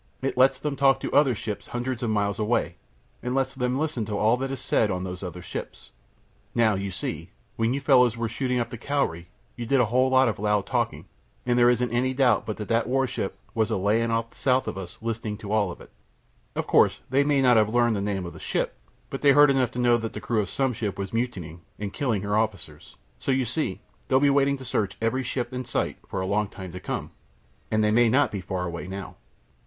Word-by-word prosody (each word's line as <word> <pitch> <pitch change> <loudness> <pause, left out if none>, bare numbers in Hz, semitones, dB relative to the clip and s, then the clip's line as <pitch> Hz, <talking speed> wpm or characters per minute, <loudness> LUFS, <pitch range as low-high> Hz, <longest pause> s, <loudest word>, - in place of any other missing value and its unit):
It 135 - -1
lets 130 +1 +4
them 145 0 -2
talk 135 -1 +4
to - - -3
other 140 -4 +4
ships 105 -1 -5
hundreds 125 +1 -3
of 120 - -1
miles 100 -1 0
away, 110 +3 +1 0.5
and 125 - -3
it - - -1
lets 135 0 0
them 125 -1 -1
listen 150 -6 -1
to 105 -1 -3
all 110 +3 +4
that 135 +1 -3
is 135 -1 -4
said 110 -4 +1
on 90 -1 -2
these 90 -1 -6
other 90 -2 -7
ships. - - -7 0.6
Now, 115 -2 +4
you 100 0 -2
see, 90 - -5 0.3
when 115 +3 +1
you 140 - -3
fellows 125 -4 +4
were 115 0 -1
shooting 125 +2 -1
up 120 +1 -2
the 120 - -7
Cowrie 105 - -1 0.3
you 120 -1 -5
did 135 +2 +3
a 125 - +5
whole 130 +4 +2
lot 130 0 +5
of 110 -5 -2
loud 105 -1 +1
talking, 115 - -1 0.4
and 120 -1 +2
there 120 0 +6
isn't 125 -1 +1
any 130 +2 0
doubt 125 -6 +3
but 110 - -3
that 105 - -5
that 115 0 +1
warship 130 -1 -1 0.2
was 110 -1 +1
a 110 - 0
lyin' 110 +4 +1
off 115 0 -1
south 130 -1 +1
of - - -3
us 95 -2 -8
listenin' 110 -2 -3
to 105 -2 -9
it - - -1
all. 100 -5 +1 0.8
Of - - -1
course - - +3
they 140 +2 +4
might 140 -1 +2
not 125 -3 +5
have 110 -1 +4
learned 120 0 +2
the 100 - -1
name 100 -2 -2
of 85 - -7
the - - -11
ship, - - -1 0.4
but - - -4
they 140 -1 +6
heard 145 0 +7
enough 130 -3 +2
to 125 - -10
know 120 -1 +4
that 115 -1 -5
the - - -5
crew 115 -3 0
of 100 - -5
some 135 -2 0
ship 105 -4 -3
was 100 +1 -5
mutinying 95 -9 -3 0.2
and 100 -1 -5
killin' 115 -9 -1
her 105 0 0
officers. 110 -2 -3 0.2
So - - -1
you 130 -1 +2
see 150 +7 -2 0.3
they'll 130 -1 +4
be 140 0 +4
waiting 140 0 +3
to 130 - -10
search 105 -5 -1
every 115 +4 0
ship 125 -1 -3
they 125 0 -3
sight 120 - -2
for 95 - -2
a - - -2
long 105 +2 +1
time 95 -2 -9
to 90 - -7
come, - - -4 0.6
and 110 0 +2
they 105 - +3
may 120 +1 +5
not 140 +5 +3
be 100 - -4
far 90 0 -3
away 85 0 -5
now." 95 0 -7
115 Hz, 245 wpm, -26 LUFS, 105-130 Hz, 0.8 s, heard